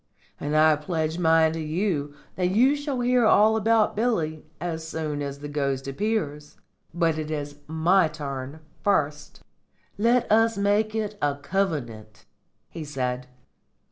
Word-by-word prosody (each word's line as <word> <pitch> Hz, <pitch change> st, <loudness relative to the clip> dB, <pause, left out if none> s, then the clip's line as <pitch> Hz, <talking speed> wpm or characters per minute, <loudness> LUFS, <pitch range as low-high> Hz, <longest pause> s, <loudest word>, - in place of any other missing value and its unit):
"And 150 Hz, +1 st, -1 dB
I 155 Hz, -1 st, +5 dB
pledge 160 Hz, +1 st, -2 dB
mine 160 Hz, -1 st, +4 dB
to 165 Hz, -, -4 dB
you 155 Hz, -2 st, -2 dB, 0.2 s
that 180 Hz, -1 st, 0 dB
you 250 Hz, +9 st, +4 dB
shall 285 Hz, -3 st, -3 dB
hear 245 Hz, 0 st, +3 dB
all 220 Hz, 0 st, +5 dB
about 220 Hz, 0 st, +2 dB
Billy 170 Hz, -9 st, -1 dB, 0.2 s
as 160 Hz, -1 st, -4 dB
soon 155 Hz, -2 st, -3 dB
as 140 Hz, -1 st, -4 dB
the 145 Hz, -, -5 dB
ghost 140 Hz, -2 st, -2 dB
appears. 150 Hz, -3 st, -3 dB, 0.3 s
But 165 Hz, -2 st, 0 dB
it 155 Hz, -1 st, -4 dB
is 145 Hz, -2 st, -4 dB
my 165 Hz, +3 st, +3 dB
turn 145 Hz, -1 st, -6 dB, 0.2 s
first." 150 Hz, -7 st, -1 dB, 0.6 s
"Let 240 Hz, +2 st, +3 dB
us 225 Hz, 0 st, +4 dB
make 205 Hz, +2 st, +1 dB
it 210 Hz, -1 st, -3 dB
a 145 Hz, -1 st, +1 dB
covenant," 125 Hz, -, -3 dB, 0.4 s
he 165 Hz, -, -7 dB
said. 125 Hz, -3 st, -3 dB
160 Hz, 140 wpm, -25 LUFS, 145-205 Hz, 0.6 s, I